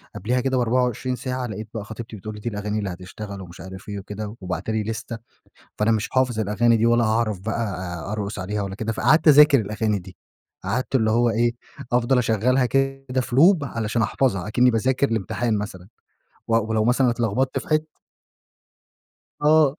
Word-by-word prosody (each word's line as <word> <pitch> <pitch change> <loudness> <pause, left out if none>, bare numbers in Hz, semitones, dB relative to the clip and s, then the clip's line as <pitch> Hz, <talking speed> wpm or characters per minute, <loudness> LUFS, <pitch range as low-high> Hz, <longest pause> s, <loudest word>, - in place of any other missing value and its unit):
قبليها 125 +7 0
كده 130 0 0
ب24 125 +1 0
ساعة، 125 0 -3
لقيت 110 -1 -6
بقى 110 -3 -4
خطيبتي 110 +1 -8
بتقول 110 +1 -7
لي 105 - -9
دي 120 - -2
الأغاني 105 0 -3
اللي 100 -2 -3
هتشتغل 95 +3 -8
ومش 90 -1 -11
عارف 95 +2 -10
إيه 100 - -4
وكده، 105 +2 -7
وباعتة 90 +3 -3
لي 110 -1 0
ليستة 115 +2 -5 0.6
فأنا 105 +2 +2
مش 110 -1 0
حافظ 130 -3 +1
الأغاني 115 +3 +2
دي، 110 - +2
ولا 120 0 +4
هاعرف 110 -2 0
بقى 95 -4 -4
أرقص 105 -1 -4
عليها 105 +3 -3
ولا 95 -1 -4
كده، 110 +2 -3
فقعدت 145 +9 +3
اذاكر 150 -2 +8
الأغاني 105 0 -1
دي. 95 0 -13 0.5
قعدت 125 +8 -2
اللي 110 -4 +3
هو 120 +1 +3
إيه 120 +1 +1 0.4
أفضل 125 +1 +3
أشغّلها 125 +2 +2
كده 135 0 0
في 125 -1 -5
لوب 165 +3 +6
علشان 115 -2 -2
أحفظها 110 -4 0
أكني 125 +3 +3
باذاكر 130 +4 +1
لإمتحان 115 +1 -1
مثلًا، 95 -3 -6 0.6
و 115 - +2
ولو 110 -1 0
مثلًا 125 +1 +3
اتلخبطت 120 +3 0
في - - -11
حت 155 0 +3 1.6
آه. 150 -2 +5
115 Hz, 175 wpm, -23 LUFS, 105-125 Hz, 1.6 s, اذاكر